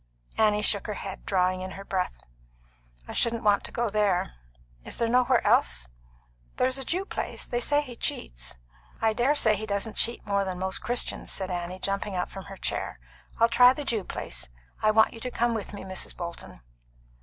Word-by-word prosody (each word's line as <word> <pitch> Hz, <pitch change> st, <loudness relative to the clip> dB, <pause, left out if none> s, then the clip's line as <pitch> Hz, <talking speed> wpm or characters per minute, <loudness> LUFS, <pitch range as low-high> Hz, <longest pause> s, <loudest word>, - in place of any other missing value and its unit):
Annie 210 Hz, -1 st, +3 dB
shook 200 Hz, -2 st, +2 dB
her 210 Hz, -, -3 dB
head, 195 Hz, -1 st, -7 dB
drawing 185 Hz, -1 st, +2 dB
in 185 Hz, 0 st, -5 dB
her 195 Hz, -, -8 dB
breath. 185 Hz, -2 st, -2 dB, 0.8 s
"I -, -, -6 dB
shouldn't 235 Hz, -1 st, +1 dB
want 205 Hz, -1 st, +4 dB
to -, -, -6 dB
go 235 Hz, -3 st, -1 dB
there. 205 Hz, -, +1 dB, 0.5 s
Is -, -, -5 dB
there 230 Hz, -, +1 dB
nowhere 250 Hz, +1 st, +3 dB
else?" -, -, +3 dB, 0.7 s
"There's 260 Hz, +1 st, +2 dB
a -, -, -3 dB
Jew 365 Hz, +8 st, -1 dB
place. -, -, -4 dB
They 240 Hz, -, -1 dB
say 290 Hz, +4 st, +3 dB
he 250 Hz, -4 st, -9 dB
cheats." -, -, -3 dB, 0.4 s
"I 220 Hz, -1 st, +2 dB
dare 250 Hz, +6 st, +2 dB
say 220 Hz, -7 st, +4 dB
he 215 Hz, +2 st, -5 dB
doesn't 200 Hz, +2 st, -1 dB
cheat 235 Hz, +1 st, +2 dB
more 200 Hz, -1 st, +1 dB
than 185 Hz, -2 st, -3 dB
most 190 Hz, +1 st, -2 dB
Christians," 240 Hz, +2 st, 0 dB
said 190 Hz, -1 st, -2 dB
Annie, 175 Hz, +1 st, -3 dB
jumping 195 Hz, 0 st, -2 dB
from 195 Hz, -1 st, -9 dB
her 195 Hz, -, -9 dB
chair. -, -, -2 dB, 0.4 s
"I'll 230 Hz, -, +6 dB
try 250 Hz, +2 st, +7 dB
the 290 Hz, +2 st, -5 dB
Jew 220 Hz, -6 st, 0 dB
place. 65 Hz, -, -4 dB, 0.3 s
I 215 Hz, -, +4 dB
want 220 Hz, +1 st, +5 dB
you 230 Hz, -, -9 dB
to 250 Hz, -, -4 dB
come 240 Hz, -1 st, +1 dB
with 220 Hz, -3 st, -4 dB
me, 205 Hz, -, -7 dB
Mrs. 190 Hz, 0 st, -3 dB
Bolton." 170 Hz, -, -7 dB
210 Hz, 195 wpm, -27 LUFS, 190-235 Hz, 0.8 s, try